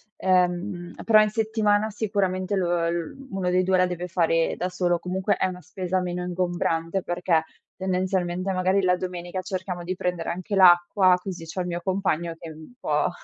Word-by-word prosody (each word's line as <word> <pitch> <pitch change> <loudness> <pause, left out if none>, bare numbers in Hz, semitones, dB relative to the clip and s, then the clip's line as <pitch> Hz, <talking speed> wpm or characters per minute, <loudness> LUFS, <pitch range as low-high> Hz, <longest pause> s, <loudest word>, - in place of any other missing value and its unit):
ehm, 180 -1 0
però 215 -1 +6
in 215 - +2
settimana 215 -1 +1
sicuramente 200 -2 -1
lo 185 -2 +1
uhm, 170 - -2
uno 190 -2 -1
dei 185 +1 +3
2 185 0 +2
la 185 0 +4
deve 180 0 -4
fare 165 -2 +1
da 180 - -2
solo. 175 -1 0
Comunque 190 +3 -1
è - - +1
una 180 0 -7
spesa 185 +1 -2
meno 180 0 -3
ingombrante, 175 0 -1
perché, 175 -2 +1 0.3
tendenzialmente, 185 0 -1
magari 185 +2 +2
la 180 -1 +3
domenica 180 0 -5
cerchiamo 185 -2 -4
di 185 +2 -3
prendere 180 -2 -2
anche 185 +4 -3
l'acqua, 180 0 +6
così 180 -4 -6
c'ho 180 +3 -4
il 180 - -3
mio 175 0 -3
compagno 175 -4 -1
che 165 - -9
è - - -8
un 155 +9 -13
po' - - +1
180 Hz, 180 wpm, -25 LUFS, 175-190 Hz, 0.3 s, però